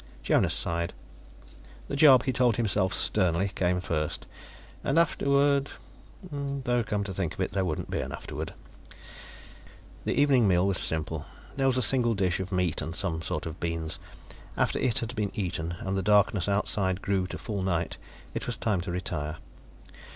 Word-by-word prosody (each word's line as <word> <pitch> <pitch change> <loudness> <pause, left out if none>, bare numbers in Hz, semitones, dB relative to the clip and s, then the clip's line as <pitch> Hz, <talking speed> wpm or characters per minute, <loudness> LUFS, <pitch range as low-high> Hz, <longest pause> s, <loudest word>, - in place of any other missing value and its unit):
Jonas - - +2
sighed. 85 0 -1 0.9
The - - -3
job, 140 -4 +7
he 130 - 0
told 125 -4 +3
himself 105 -4 +1
sternly, 95 -1 +2
came 90 0 +1
first. 80 -4 -2 0.6
And 140 - +1
afterward 140 -3 +3 0.5
Though, 140 -6 -2
come 105 -1 -1
to 100 -1 -4
think 90 -3 -2
of - - -16
it, 95 - -1
there 95 -1 0
wouldn't 80 -4 -3
be - - -1
an - - -4
afterward. - - -6 1.5
The - - +1
evening 135 -6 +5
meal 90 -1 +3
was 100 -2 +3
simple. 80 -1 -2 0.3
There 135 -1 +2
was 130 -1 +2
a 130 - +2
single 120 0 +4
dish 95 -2 +1
of 95 +1 -4
meat 90 -3 0
and 80 +2 -5
some 90 -4 -2
sort - - -3
of 80 0 -6
beans; 85 -1 -2 0.6
after - - +1
it 125 -4 +1
had 115 +2 -1
been 105 -2 0
eaten, 85 -4 -2
and 95 0 -2
the 95 - 0
darkness 105 -2 +3
outside 100 -2 0
grew 95 -2 0
to - - -6
full 105 -4 -4
night, 85 -3 -1 0.4
it - - -4
was - - -2
time 105 -5 0
to 90 - -6
retire. 75 -4 -2
95 Hz, 175 wpm, -28 LUFS, 90-120 Hz, 1.5 s, job